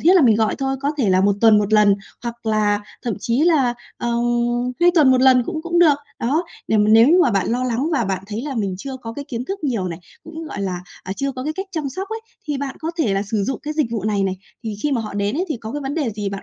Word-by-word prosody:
thiết 350 +4 +5
là 365 - +6
mình 225 -5 +5
gọi 220 -1 +1
thôi. 270 0 -1
Có 280 - 0
thể 235 -7 +2
là 185 0 +4
1 200 +1 +3
tuần 220 -2 +6
1 210 0 -1
lần, 210 -2 +6 0.3
hoặc 235 -1 -6
là 210 -1 +2 0.2
thậm 235 -4 -1
chí 235 +3 0
là, 295 -7 +3 0.2
ờ, 240 - -3 0.7
2 350 +1 +6
tuần 300 -6 +6
1 255 -1 +4
lần 255 -1 +6
cũng 315 -3 -4
cũng 345 0 0
được, 325 -4 +6 0.2
đó. 295 +9 0 0.2
Để 220 - +3
mà 210 - +4
nếu 225 +3 +7
như 350 +4 +5
mà 260 - +3
bạn 195 -3 0
lo 250 +2 0
lắng 255 +5 -1
và 275 -6 +1
bạn 190 -2 -2
thấy 215 +3 -4
là 285 -1 -4
mình 200 -5 -1
chưa 265 +5 -6
có 230 -3 -8
cái 285 +2 -6
kiến 240 -1 -4
thức 390 +2 -5
nhiều 225 -10 -1
này, 165 -2 -6 0.3
cũng, 325 0 -8
gọi 285 -9 -6
là, 180 -2 -2 0.2
à, 190 - -4
chưa 275 0 -1
có 255 0 -6
cái 305 - -1
cách 385 +5 -5
chăm 310 -4 -2
sóc 380 +9 -5
ấy, 445 +1 -4 0.3
thì 290 - 0
bạn 275 -1 -4
có 320 - -2
thể 225 -11 +2
là 195 - 0
sử 210 0 -1
dụng 270 - -3
cái 300 +1 -4
dịch 305 -4 +1
vụ 220 -4 -3
này 210 -2 +1
này. 190 -1 -1 0.3
Thì 215 -2 -4
khi 295 - +1
mà 250 - +1
họ 215 -2 -6
đến 205 +4 -1
ấy, 355 - 0
thì 300 - -2
có 220 0 -7
cái 295 - -3
vấn 275 0 -3
đề 290 -8 0
gì 205 -1 -3
bạn 195 0 -6
245 Hz, 300 wpm, -21 LUFS, 210-295 Hz, 0.7 s, nếu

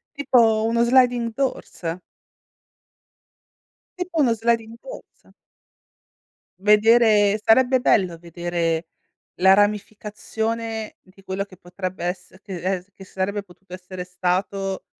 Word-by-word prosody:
Tipo 230 -6 +3
uno 235 +1 +2
sliding 245 -1 +3
doors? 185 -10 -3 2.0
Tipo 360 -3 -1
uno 245 -5 +3
sliding 230 0 -1
doors. - - -13 1.3
Vedere 210 0 +4
sarebbe 260 +3 +4
bello 185 -8 +2
vedere 170 -1 -3 0.5
la 190 +2 +5
ramificazione 215 +2 -2
di 190 +1 -21
quello 190 0 -3
che 195 - -16
potrebbe 180 0 -6
esser 185 +1 -6
che 195 -3 -8
es 185 +1 -3
che 195 - -12
sarebbe 195 +2 -3
potuto 185 -1 -13
essere 185 0 -8
stato, 185 +2 -2
205 Hz, 105 wpm, -22 LUFS, 185-230 Hz, 2.0 s, la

